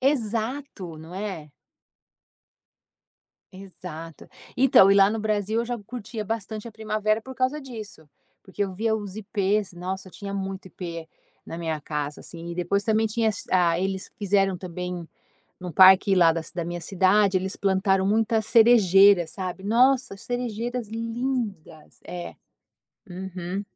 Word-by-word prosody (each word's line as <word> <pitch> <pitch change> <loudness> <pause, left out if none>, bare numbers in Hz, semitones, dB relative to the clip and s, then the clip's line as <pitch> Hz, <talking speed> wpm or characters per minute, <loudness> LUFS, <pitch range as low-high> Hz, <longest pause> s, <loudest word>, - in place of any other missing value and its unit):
Exato, 230 - -2
não 160 +3 -11
é. 190 -7 -5 2.0
Exato. 180 -4 -10 0.3
Então 240 -7 +6
e - - +6
lá 195 0 +6
no 220 +1 -2
Brasil 215 +1 0
eu - - -2
já 240 0 -3
curtia 220 0 -7
bastante 220 +1 -4
a - - -13
primavera 215 0 -1
por 260 +2 -9
causa 260 +4 0
disso, 215 - -10 0.3
porque 195 +2 -4
eu 195 -2 -2
via 220 +4 0
os 205 -2 -5
Ipês, 205 -1 -1
nossa 185 +2 -5
tinha 200 +1 -7
muito 190 -1 -5
Ipê 170 -3 -7 0.4
na 165 - -6
minha 160 -3 -3
casa 150 0 -4
assim 170 0 -8
e 170 - -5
depois 180 +3 0
também 220 0 +2
tinha 220 +1 0
as - - -5 0.3
eles 190 0 -2
quiseram 195 -2 +1
também 180 -1 -6 0.5
num 180 -3 -7
parque 190 +2 +7
lá 170 -2 +6
da 165 0 -2
ci 160 - -8
da 175 - -2
minha 175 +1 -4
cidade 190 +2 +2
eles 190 +1 -3
plantaram 190 -1 +2
muitas 220 +1 +1
cerejeiras, 200 -6 +6
sabe. 190 -1 -5
Nossa 250 0 +3
cerejeiras 240 +1 -4
lindas, 225 - -4
é. 175 -1 -7 0.8
Uhum. 185 +1 -5
195 Hz, 145 wpm, -25 LUFS, 180-220 Hz, 2.0 s, parque